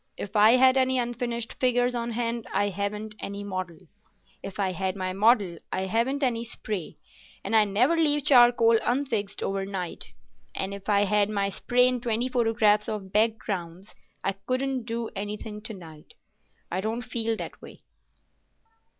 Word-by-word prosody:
If 205 +2 -7
I 215 +2 +7
had 260 +1 +5
any 260 0 +2
unfinished 240 -1 -3
figures 245 -1 +2
on 235 -1 -3
hand, 235 0 -2
I 205 +1 +1
haven't 205 +2 -4
any 200 0 -5
model; 185 -4 -5 0.6
if 195 - -8
I 190 -2 +1
had 185 +1 -2
my 185 -1 -3
model, 200 -4 +3
I 190 - -1
haven't 235 +9 0
any 235 -3 0
spray, 215 -6 -5 0.5
and - - -1
I 215 -1 +6
never 235 +11 +2
leave 295 -3 +1
charcoal 240 -4 +6
unfixed 235 -6 -1
overnight; 195 -2 -4 0.5
and 190 +1 -3
if 200 +1 -8
I 205 -1 +4
had 205 0 +2
my 200 -2 0
spray 250 +5 +2
and 250 -1 -1
twenty 235 +1 -1
photographs 225 -4 +2
of 195 -3 -5
backgrounds, 200 -4 -1 0.3
I 195 - +1
couldn't 255 +5 -2
do 230 -1 -3
anything 210 +1 -5
to 225 +1 -7
night. 160 -4 -13 0.6
I 185 +2 -1
don't 225 +4 -3
feel 230 -2 -1
that - - -7
way." - - -13
220 Hz, 160 wpm, -26 LUFS, 200-240 Hz, 0.6 s, I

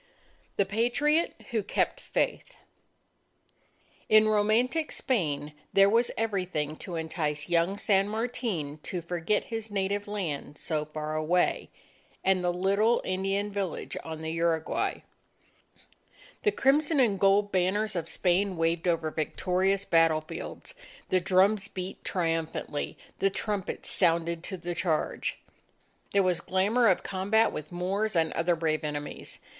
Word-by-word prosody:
THE 200 - +2
PATRIOT 245 - +1 0.2
WHO 225 -2 +1
KEPT 350 - 0
FAITH - - -2 1.5
In 215 0 +7
romantic 220 +9 +2
Spain, 150 - -1 0.2
there 195 0 +6
was 235 +2 +3
everything 185 -9 -1
to 175 - -6
entice 155 -2 -2
young 175 +3 +2
San 200 -1 +2
Martin 215 - -3
to 175 +1 -4
forget 175 +4 0
his 225 -1 -4
native 200 0 -1
land 160 -8 -4
so 155 -1 -2
far 155 0 -4
away, 165 +3 +1 0.5
and 190 -1 +2
the 175 - +2
little 200 +6 +2
Indian 195 +2 -1
village 195 -4 -3
on 160 -1 -6
the 160 0 -3
Uruguay. 165 -1 0 1.4
The 420 - +3
crimson 290 -1 +3
and 215 -7 +3
gold 200 +1 +4
banners 195 +3 +1
of 170 - -3
Spain 185 +1 +1
waved 165 +1 0
over 165 -2 +1
victorious 185 +5 0
battle 165 -1 +4
fields, 155 - -8 0.4
the 185 - +3
drums 195 +3 +3
beat 185 -1 -6
triumphantly, 165 -4 -2 0.2
the 195 - +3
trumpets 200 -1 -3
sounded 170 -2 +2
to 190 - -4
the 175 0 -4
charge. 165 -2 -1 0.7
There 200 -1 +4
was 180 -2 +1
glamour 205 +7 +2
of 185 - +3
combat 205 +4 +2
with 155 +2 -7
Moors 190 +4 -1
and 160 -1 +2
other 170 +1 +1
brave 155 -1 -1
enemies. 145 -1 -5
185 Hz, 130 wpm, -28 LUFS, 165-205 Hz, 1.5 s, In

